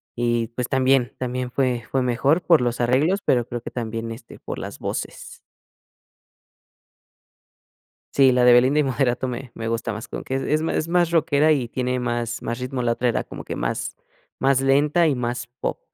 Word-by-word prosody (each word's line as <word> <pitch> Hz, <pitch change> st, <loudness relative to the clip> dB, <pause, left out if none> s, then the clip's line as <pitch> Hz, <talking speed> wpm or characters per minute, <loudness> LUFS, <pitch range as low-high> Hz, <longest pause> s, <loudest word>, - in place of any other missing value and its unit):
y, 120 Hz, -1 st, 0 dB
pues, 125 Hz, +1 st, -4 dB
también 130 Hz, -1 st, +2 dB
también 125 Hz, 0 st, -3 dB
fue 125 Hz, -3 st, -1 dB
fue 135 Hz, -1 st, +1 dB
mejor 135 Hz, +7 st, +2 dB
por 165 Hz, -6 st, +5 dB
los 120 Hz, 0 st, -1 dB
arreglos, 145 Hz, +11 st, +2 dB
pero 120 Hz, -2 st, +2 dB
creo 120 Hz, -1 st, -5 dB
que -, -, -8 dB
también, 115 Hz, -1 st, -4 dB
este, 115 Hz, 0 st, -10 dB
por -, -, -6 dB
las -, -, -7 dB
voces. -, -, -5 dB, 2.8 s
Sí, 135 Hz, -2 st, +6 dB
la 125 Hz, -1 st, +3 dB
de 125 Hz, -, +7 dB
Belinda 130 Hz, +4 st, +5 dB
y 150 Hz, -, +3 dB
Moderato 130 Hz, -1 st, 0 dB
me 125 Hz, 0 st, -6 dB
me 115 Hz, -, -5 dB
gusta 115 Hz, -1 st, -2 dB
más 110 Hz, +2 st, -6 dB
como -, -, -6 dB
que, 130 Hz, -, -3 dB
e 135 Hz, -, -2 dB
es 155 Hz, -, +1 dB
más 160 Hz, -1 st, -1 dB
más 175 Hz, 0 st, +2 dB
rockera 155 Hz, -2 st, +3 dB
y 140 Hz, -6 st, +2 dB
tiene 125 Hz, +1 st, -2 dB
más 120 Hz, -1 st, -2 dB
más 120 Hz, +2 st, -4 dB
ritmo, 125 Hz, 0 st, -3 dB
la 120 Hz, -1 st, +1 dB
otra 125 Hz, +1 st, 0 dB
era 115 Hz, -, 0 dB
como -, -, -9 dB
que, -, -, -6 dB
más -, -, -3 dB, 0.4 s
más 135 Hz, -1 st, +3 dB
lenta 145 Hz, +5 st, +3 dB
y 140 Hz, -, +1 dB
más 120 Hz, 0 st, -3 dB
pop. -, -, -3 dB
125 Hz, 190 wpm, -23 LUFS, 120-135 Hz, 2.8 s, de